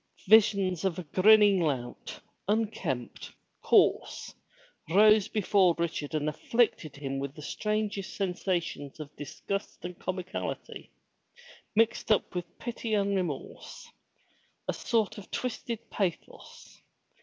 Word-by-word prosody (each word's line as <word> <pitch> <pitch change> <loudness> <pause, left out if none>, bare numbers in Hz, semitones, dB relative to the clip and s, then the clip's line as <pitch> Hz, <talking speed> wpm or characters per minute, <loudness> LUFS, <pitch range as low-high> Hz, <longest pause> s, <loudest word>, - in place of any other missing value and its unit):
Visions 195 -4 +5
of 190 -4 0
a 180 - -4
grinning 205 +4 +5
lout, 130 -6 -3 0.3
unkempt, 195 - -2 0.3
coarse, - - +2 0.6
rose 210 +3 +6
before 195 -4 +3
Richard 160 -3 -2
and 150 0 0
afflicted 160 - 0
him 135 -1 -4
with 140 0 -5
the 150 - -10
strangest 210 +1 -2
sensations 180 -6 -2
of 150 -1 -9
disgust 185 +6 -5
and 180 0 -7
comicality, 185 0 -5 0.9
mixed 225 0 +2
up 210 - +2
with 175 -1 -6
pity 235 -2 -3
and 200 -1 +1
remorse, 175 -8 -5 0.4
— - - -39
a - - 0
sort 220 -2 0
of 195 - -13
twisted 235 -2 -4
pathos. 185 -5 -5
190 Hz, 115 wpm, -29 LUFS, 160-215 Hz, 0.9 s, rose